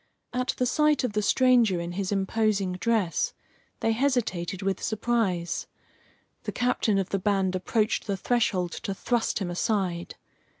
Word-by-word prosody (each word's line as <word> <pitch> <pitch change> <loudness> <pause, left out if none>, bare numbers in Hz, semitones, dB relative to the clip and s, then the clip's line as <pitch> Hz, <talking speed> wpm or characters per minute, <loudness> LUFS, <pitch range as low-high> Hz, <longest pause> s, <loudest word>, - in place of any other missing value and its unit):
At 250 +1 -1
the 250 - +1
sight 300 +3 +2
of 250 - -1
the 210 - +1
stranger 235 -4 +4
in 170 0 -4
his 190 +2 -3
imposing 200 -1 +1
dress 200 -2 0 0.5
they 225 - +2
hesitated 220 -8 0
with 195 0 -1
surprise. 215 -6 -1 0.7
The - - -4
captain 245 -4 +1
of 195 -1 -1
the 195 - 0
band 190 -1 +1
approached 215 +4 0
the 200 -1 -1
threshold 190 -5 +1
to 195 - -4
thrust 240 +3 0
him 185 -4 -2
aside. 180 -3 -1
205 Hz, 145 wpm, -27 LUFS, 185-235 Hz, 0.7 s, stranger